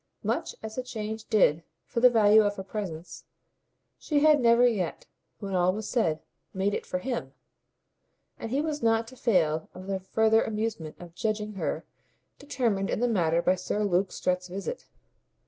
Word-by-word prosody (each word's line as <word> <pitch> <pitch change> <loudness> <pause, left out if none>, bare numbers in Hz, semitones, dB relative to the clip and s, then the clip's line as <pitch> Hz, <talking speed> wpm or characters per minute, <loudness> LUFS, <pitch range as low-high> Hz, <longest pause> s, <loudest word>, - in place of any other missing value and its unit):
Much - - -2
as 220 0 -6
the - - 0
change 220 -3 -5
did 170 -8 +3 0.2
for - - -3
the 250 +1 +7
value 220 -2 +6
of 205 -1 0
her 190 - -6
presence, 185 -4 -6 0.8
she 295 -2 0
had 305 -1 +6
never 235 +1 +5
yet, 200 -9 -1 0.3
when 195 -2 -6
all 180 0 +3
was 210 +2 -5
said, 165 -11 0 0.3
made 195 +2 0
it - - -4
for 180 - -2
HIM; 240 +5 -4 1.1
and 225 - -5
he 270 +5 0
was 305 -1 -3
not 225 0 +2
to 260 - -14
fail 165 -10 +1
of 185 +1 -9
the 195 0 -2
further 220 +4 +3
amusement 215 -8 -3
of 175 -1 -11
judging 215 +1 -2
her 195 - -3 0.5
determined 230 -9 -1
in - - -1
the 245 - +2
matter 170 -6 +1
by 180 - +4
Sir 185 +3 -2
Luke 190 -1 +1
Strett's 180 0 -1
visit. 195 - -6
210 Hz, 175 wpm, -27 LUFS, 185-230 Hz, 1.1 s, the